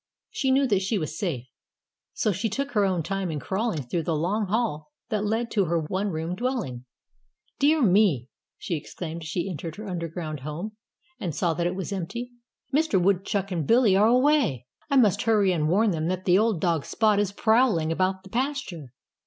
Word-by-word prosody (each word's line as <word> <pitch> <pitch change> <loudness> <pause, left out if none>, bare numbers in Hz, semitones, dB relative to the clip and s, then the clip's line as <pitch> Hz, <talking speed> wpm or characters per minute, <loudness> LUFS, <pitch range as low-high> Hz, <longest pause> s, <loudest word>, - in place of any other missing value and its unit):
She 265 - -1
knew 270 +1 +4
that 205 -7 +2
she 200 +3 0
was 155 -3 -3
safe. 155 - -3 0.7
So 215 - +1
she 200 +5 -1
took 275 +7 -3
her 210 -4 +2
own 185 -4 0
time 195 +1 -2
in 155 -2 -3
crawling 195 - -2
through 145 +8 -2
the 160 0 -1
long 195 +7 0
hall 185 -8 -1 0.2
that 210 -1 -1
led 225 +3 -1
to 200 -3 +2
her 170 0 +1
one 185 +6 -2
room 165 0 -3
dwelling. 200 - -3 0.7
"Dear 295 +1 +4
me!" 185 - +3 0.3
she - - -4
exclaimed 165 +2 -6
as 160 - -7
she 170 +4 -2
entered 165 -2 -5
her 215 0 -8
underground 165 -3 -4
home 160 +10 -6 0.4
and 170 -7 -3
saw 170 -2 +1
that 170 +2 0
it 175 - -2
was 190 +1 -4
empty. 235 +7 -4 0.4
"Mr. 300 -9 +3
Woodchuck 195 +1 0
and 165 -5 -2
Billy 230 -5 +5
are 205 +3 +5
away. 250 - +3 0.2
I 280 - +1
must 215 -8 +4
hurry 210 -4 +3
and 155 -3 0
warn 205 +4 +3
them 160 -2 -1
that 185 +1 -3
old 200 +1 +3
dog 165 -4 +1
Spot 215 -2 +2
is 205 -2 0
prowling 220 -7 +2
about 190 +2 0
the 190 - -14
pasture." 235 - -3
190 Hz, 195 wpm, -26 LUFS, 165-220 Hz, 0.7 s, Billy